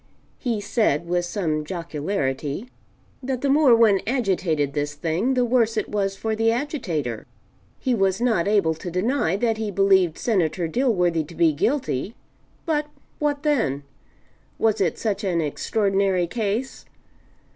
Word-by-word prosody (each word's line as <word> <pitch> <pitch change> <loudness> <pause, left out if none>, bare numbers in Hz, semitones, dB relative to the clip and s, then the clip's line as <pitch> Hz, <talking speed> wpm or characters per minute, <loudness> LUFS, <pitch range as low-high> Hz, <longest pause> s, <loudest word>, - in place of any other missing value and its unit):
He 235 -5 -1
said 205 - +1
with 175 0 0
some 160 -5 -2
jocularity 150 - -3 0.5
that 255 -1 -3
the 280 - +2
more 280 -4 +6
one 220 -4 +5
agitated 185 - 0
this 145 0 -2
thing, 170 - 0
the 250 -1 +2
worse 230 -2 +2
it - - -1
was 195 -2 -1
for 220 +2 -2
the 225 +1 +2
agitator. 180 - -3 0.5
He 255 - -1
was 195 -3 +1
not 225 -7 +1
able 200 -6 +3
to 160 +3 -7
deny 185 - 0
that 225 +1 0
he 220 -1 -2
believed 190 -4 +3
Senator 180 -6 0
Dilworthy 180 - +1
to 170 - -12
be 165 -2 +3
guilty 225 - -1 0.5
but 300 -3 0 0.3
what 290 -1 -1
then? 225 - +1 0.7
Was 220 -2 +1
it 175 -4 +1
such 215 -2 -2
an 180 -4 0
extraordinary 195 +3 +1
case? 225 +6 -3
195 Hz, 145 wpm, -23 LUFS, 165-235 Hz, 0.7 s, more